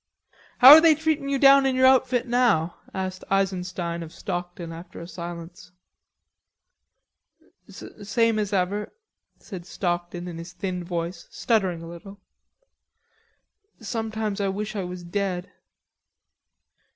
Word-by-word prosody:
"How 260 +2 +10
are 310 +2 +11
they 325 -2 +6
treatin' 310 -2 -1
you 280 - +1
down 275 0 +6
in 260 - 0
your 260 0 +4
outfit 255 -2 +3
now?" 235 -9 +1
asked 185 -1 -5
Eisenstein 180 -3 -1
of 165 -1 -8
Stockton, 175 0 -6
after 170 +2 -11
a 170 - -8
silence. 175 +2 -9 2.0
"Same 225 +2 -1
as 205 -1 -2
ever," 200 +2 -1 0.4
said 185 -5 -9
Stockton 175 -1 -3
in 170 -2 -7
his 170 +1 -9
thin 180 0 -4
voice, 170 0 -5
stuttering 190 -8 -1
a - - -9
little.... 185 +4 -11 1.6
"Sometimes 220 -2 -3
I 200 - 0
wish 210 +3 -4
I 200 - -2
was 180 0 -7
dead." 180 0 -3
190 Hz, 125 wpm, -24 LUFS, 175-225 Hz, 2.0 s, are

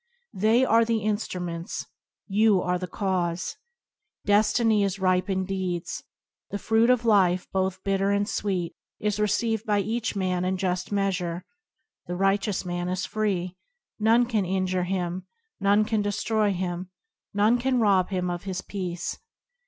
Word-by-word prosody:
They 220 +6 +3
are 230 -1 +5
the 225 -2 0
instruments, 180 -5 -3 0.4
you 210 -1 +3
are 180 0 0
the 180 - -4
cause. 180 -2 -2 0.7
Destiny 215 +1 +3
is 195 0 -1
ripened 185 0 +1
deeds. 185 -2 -3 0.5
The 205 - -3
fruit 225 +3 +2
of 250 -2 +3
life, 185 -5 +4
both 190 0 -1
bit 195 -1 +1
ter 195 +1 +1
and 200 0 +1
sweet, 185 -6 -2 0.3
is 210 0 -1
received 215 +1 +1
by 210 -2 +1
each 220 +2 -2
man 185 -2 0
in 185 +1 0
just 185 0 -2
measure. 185 -4 -1 0.6
The 180 - -3
righteous 195 +1 +1
man 175 0 -2
is 185 +1 -1
free. 190 -4 -1 0.4
None 225 +3 +4
can 225 -4 0
injure 185 0 0
him; 180 -1 -3 0.3
none 205 +2 +3
can 220 -1 0
destroy 205 +1 +1
him; 180 -1 -3 0.4
none 215 +4 +3
can 255 0 +1
rob 195 -5 +3
him 180 -2 -1
of 175 +2 -5
his 185 -2 -3
peace. 180 -3 -4
195 Hz, 150 wpm, -26 LUFS, 180-215 Hz, 0.7 s, are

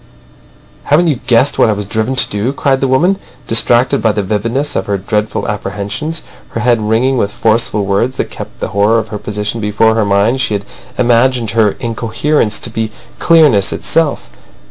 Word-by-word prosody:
"Haven't 155 +5 +3
you 140 -6 -1
guessed 125 +3 +3
what - - +5
I - - +3
was 105 0 -4
driven 110 +5 -2
to 125 - +3
do!" 105 +6 -2
cried 135 -1 0
the 135 - +2
woman. 175 +10 +2 0.3
Distracted 120 +2 +3
by 110 - +3
the 105 -1 -2
vividness 115 +9 -2
of 95 - -2
her 100 -1 0
dreadful 105 +2 -2
apprehensions, 105 +10 -4 0.3
her 115 - -4
head 120 -2 +2
ringing 115 +5 +1
with 100 - 0
forceful 110 -1 0
words, 110 +7 0
that - - -3
kept - - -9
the - - -2
horror 105 +3 +2
of 110 -1 -2
her 105 - -5
position 105 +2 -4
before 105 +2 +2
her 110 -1 +1
mind, 100 +6 +1
she 110 - 0
had 100 0 -4 0.3
imagined 120 -1 +2
her 110 -2 +2
incoherence 115 +1 -1
to 115 - -3
be 110 -1 -2 0.3
clearness 150 - +4
itself. 145 - -1
115 Hz, 185 wpm, -14 LUFS, 105-130 Hz, 0.3 s, what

